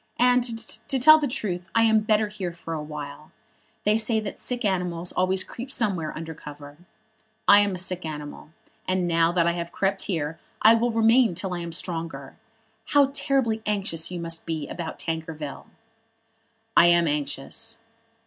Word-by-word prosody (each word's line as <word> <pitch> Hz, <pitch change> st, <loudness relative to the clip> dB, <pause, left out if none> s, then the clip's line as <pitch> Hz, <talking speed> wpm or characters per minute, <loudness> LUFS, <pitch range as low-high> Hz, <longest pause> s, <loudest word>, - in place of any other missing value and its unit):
And, 250 Hz, +1 st, +4 dB, 0.5 s
to 270 Hz, -, +2 dB
tell 310 Hz, +5 st, +8 dB
the 295 Hz, -, 0 dB
truth, 185 Hz, -8 st, -4 dB
I 230 Hz, -, +5 dB
am 220 Hz, -1 st, +5 dB
better 215 Hz, 0 st, +2 dB
here 195 Hz, -5 st, -5 dB
for 165 Hz, -1 st, -7 dB
awhile. 150 Hz, -1 st, -7 dB, 0.5 s
They 210 Hz, +1 st, +3 dB
say 220 Hz, 0 st, +2 dB
that 215 Hz, -2 st, -6 dB
the -, -, -19 dB
sick 245 Hz, -2 st, -2 dB
animals 180 Hz, -3 st, -1 dB
always 185 Hz, +1 st, +1 dB
creep 245 Hz, +3 st, -8 dB
somewhere 195 Hz, -, -1 dB
under 160 Hz, 0 st, -6 dB
cover. 145 Hz, -1 st, -11 dB, 0.7 s
I 205 Hz, -, +9 dB
am 205 Hz, -2 st, +1 dB
a -, -, -5 dB
sick 185 Hz, 0 st, -1 dB
animal, 150 Hz, -2 st, -7 dB, 0.4 s
and 185 Hz, -1 st, +1 dB
now 165 Hz, 0 st, +3 dB
that 170 Hz, -2 st, +2 dB
I 170 Hz, -, +3 dB
have 170 Hz, 0 st, -4 dB
crept 195 Hz, 0 st, 0 dB
here 160 Hz, -4 st, -2 dB, 0.2 s
I 220 Hz, -, +9 dB
will 230 Hz, +1 st, +2 dB
remain 225 Hz, -2 st, +4 dB
till 190 Hz, +1 st, -3 dB
I 175 Hz, -, -3 dB
am 170 Hz, -1 st, -5 dB
stronger. 165 Hz, -1 st, -4 dB, 0.5 s
How 285 Hz, -2 st, +4 dB
terribly 260 Hz, -6 st, 0 dB
anxious 195 Hz, -6 st, -1 dB
you 180 Hz, -1 st, -5 dB
must 165 Hz, -1 st, -3 dB
be 160 Hz, -3 st, -3 dB
about 170 Hz, -2 st, -6 dB
Tankerville!" 160 Hz, -3 st, -5 dB, 1.1 s
"I 170 Hz, -, +7 dB
am 170 Hz, -1 st, +4 dB
anxious." 145 Hz, +10 st, -3 dB
180 Hz, 170 wpm, -25 LUFS, 165-220 Hz, 1.1 s, I